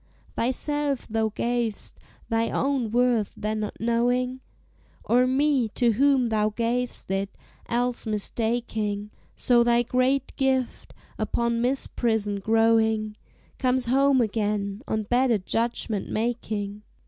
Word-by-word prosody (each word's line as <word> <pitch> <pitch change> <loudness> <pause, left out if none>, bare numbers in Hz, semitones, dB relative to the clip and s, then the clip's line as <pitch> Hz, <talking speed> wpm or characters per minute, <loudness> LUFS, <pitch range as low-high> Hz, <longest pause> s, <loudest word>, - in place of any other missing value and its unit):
Thyself 280 +2 -1
thou 220 0 0
gav'st, 235 0 -3 0.3
thy 230 0 0
own 270 -4 0
worth 240 -2 +1
then 215 +1 -2
not 210 - -5
knowing? 245 +3 0 0.6
Or 250 +2 +3
me, 265 -2 +2
to 240 -2 +3
whom 260 +1 +3
thou 215 -1 +2
gav'st 235 0 -2
it, 195 +1 -2 0.3
else 245 0 -1
mistaking; 215 -1 -2 0.2
So 240 -1 +4
thy 235 0 +3
great 255 +2 0
gift, 265 -2 -1 0.2
upon 235 0 0
misprision 225 -5 0
growing, 220 0 +2 0.4
Comes 255 -1 +1
home 270 +1 +3
again, 205 -2 -1
on 220 0 -1
better 245 +1 +2
judgment 225 +1 -2
making. 215 -3 -3
235 Hz, 110 wpm, -25 LUFS, 215-250 Hz, 0.6 s, So